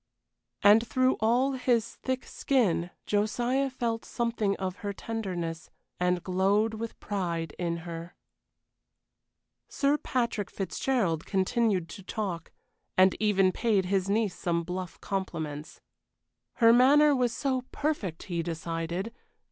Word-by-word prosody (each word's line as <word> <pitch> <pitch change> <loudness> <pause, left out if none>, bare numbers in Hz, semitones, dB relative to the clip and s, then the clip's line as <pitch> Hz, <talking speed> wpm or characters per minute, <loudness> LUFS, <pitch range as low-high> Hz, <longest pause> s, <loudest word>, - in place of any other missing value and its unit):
And 215 +3 +6
through 255 +2 +2
all 245 +5 +3
his 250 -3 +1
thick 260 0 -3
skin 200 -10 +1 0.2
Josiah 240 +6 +1
felt 235 -3 -2
something 230 -4 -1
of 190 0 -4
her 205 -2 -4
tenderness, 180 -8 -4 0.3
and 180 0 +1
glowed 195 +4 +2
with 225 +1 -6
pride 170 -6 -3
in 170 -1 -1
her. 170 0 -7 1.5
Sir 285 +1 +1
Patrick 235 -6 -1
Fitzgerald 190 - -1
continued 195 -2 +1
to 195 - -9
talk, 185 -4 -4 0.5
and 185 0 +6
even 195 -3 +3
paid 205 -3 +1
his 190 0 0
niece 210 -2 +1
some 170 -1 -1
bluff 180 +1 -5
compliments. 160 -6 -4 0.7
Her 230 -1 +6
manner 285 +4 +6
was 250 -2 +1
so 260 +1 -1
perfect, 255 - -2
he 170 -2 -2
decided! 165 +5 -3
205 Hz, 120 wpm, -28 LUFS, 180-235 Hz, 1.5 s, And